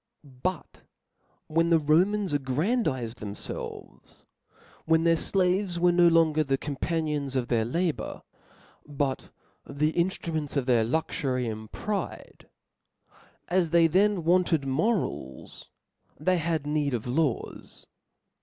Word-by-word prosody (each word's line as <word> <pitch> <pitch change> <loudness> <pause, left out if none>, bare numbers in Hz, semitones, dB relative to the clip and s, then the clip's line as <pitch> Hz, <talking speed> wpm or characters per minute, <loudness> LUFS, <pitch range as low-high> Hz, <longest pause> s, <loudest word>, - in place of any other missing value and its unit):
But 145 +5 -5 0.6
when 165 +2 +1
the 165 - +5
Romans 180 +5 +2
aggrandized 135 - -1
themfelves; 105 -1 -8 0.6
when 160 0 +3
their 165 0 +4
flaves 185 +1 +1
were 175 0 +4
no 175 0 +5
longer 160 -2 +4
the 135 -2 0
companions 145 -1 -2
of 125 -2 -1
their 115 -2 +2
labour, 160 -1 -2 0.6
but 140 -2 -3 0.4
^he 150 +3 0
inftruments 165 -4 -2
of 135 - 0
their 120 -3 +3
luxury 130 -1 -1
and 110 -1 -6
pride; 205 -3 -5 1.0
as 175 -1 +1
they 170 0 +5
thea» 195 +4 +3
wanted 170 -3 +2
morals, 135 - -2 0.5
they 180 +4 +1
had 160 -2 -1
need 145 -3 0
of 115 - -4
laws. 130 +1 -2
155 Hz, 115 wpm, -27 LUFS, 135-175 Hz, 1.0 s, the